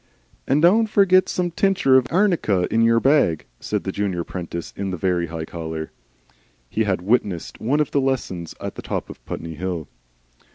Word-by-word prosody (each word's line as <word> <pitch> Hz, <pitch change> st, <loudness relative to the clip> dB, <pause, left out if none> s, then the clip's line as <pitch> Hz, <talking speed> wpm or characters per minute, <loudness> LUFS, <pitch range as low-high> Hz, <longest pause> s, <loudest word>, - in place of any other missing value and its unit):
"And 145 Hz, +4 st, +2 dB
done 215 Hz, +6 st, +5 dB
forget 185 Hz, -3 st, +4 dB
some 175 Hz, -1 st, -1 dB
tinscher 190 Hz, -7 st, +3 dB
of 130 Hz, -1 st, +4 dB
arnica 165 Hz, -, +2 dB
in 115 Hz, -, +3 dB
yer 115 Hz, 0 st, +4 dB
bag," 135 Hz, -, +3 dB
said 105 Hz, -1 st, -2 dB
the 95 Hz, -, -3 dB
junior 95 Hz, -3 st, -2 dB
apprentice 85 Hz, -1 st, -6 dB
in 100 Hz, 0 st, -3 dB
the 90 Hz, -, -3 dB
very 90 Hz, -1 st, 0 dB
high 80 Hz, 0 st, -5 dB
collar. 80 Hz, -1 st, -6 dB, 0.8 s
(He 110 Hz, -, +1 dB
had 95 Hz, -3 st, -1 dB
witnessed 100 Hz, -5 st, -1 dB
one 135 Hz, +7 st, +1 dB
of 150 Hz, -, 0 dB
the 140 Hz, -, +2 dB
lessons 115 Hz, -11 st, -2 dB
at -, -, -5 dB
the -, -, -8 dB
top -, -, -4 dB
of -, -, -14 dB
Putney 80 Hz, 0 st, -5 dB
Hill.) 85 Hz, -1 st, -4 dB
105 Hz, 180 wpm, -22 LUFS, 85-145 Hz, 0.8 s, done